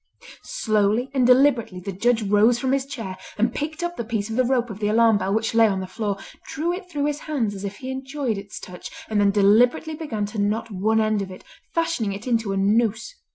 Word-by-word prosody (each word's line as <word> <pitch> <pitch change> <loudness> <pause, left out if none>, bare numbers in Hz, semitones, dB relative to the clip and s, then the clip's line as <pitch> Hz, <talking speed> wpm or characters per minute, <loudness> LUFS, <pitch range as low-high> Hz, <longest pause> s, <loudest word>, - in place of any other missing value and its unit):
Slowly 215 +4 +2
and 255 -3 +3
deliberately 250 -7 +4
the 195 +2 -5
Judge 225 +4 +1
rose 210 +4 +4
from 260 +1 -1
his 275 0 0
chair 205 -9 -6 0.2
and 230 +3 +1
picked 310 +3 -4
up 345 0 -3
the - - -2
piece 220 -2 -3
of - - -3
the 255 - +3
rope 245 -2 0
of 205 - -8
the 205 - 0
alarm 225 0 +4
bell 195 - -2
which 220 +2 0
lay 225 -1 +6
on 195 -2 -1
the 190 - -4
floor, 200 +1 -3 0.3
drew 335 +4 -2
it 360 0 -7
through 290 -4 -1
his 295 0 -1
hands 270 -10 -2
as 195 0 -8
if 200 0 -4
he 260 0 -6
enjoyed 265 -4 -3
its 200 +1 -9
touch, 180 -1 -9 0.2
and 210 -1 +2
then 200 - +4
deliberately 220 +10 +3
began 275 -10 -3
to 210 +1 -6
knot 220 +2 -1
one 215 +3 +1
end 215 -1 +1
of 195 - -5
it, 185 - -11 0.3
fashioning 330 -12 0
it 200 +3 -8
into 230 -5 0
a 195 - -1
noose. 220 - +1
225 Hz, 235 wpm, -23 LUFS, 205-260 Hz, 0.3 s, lay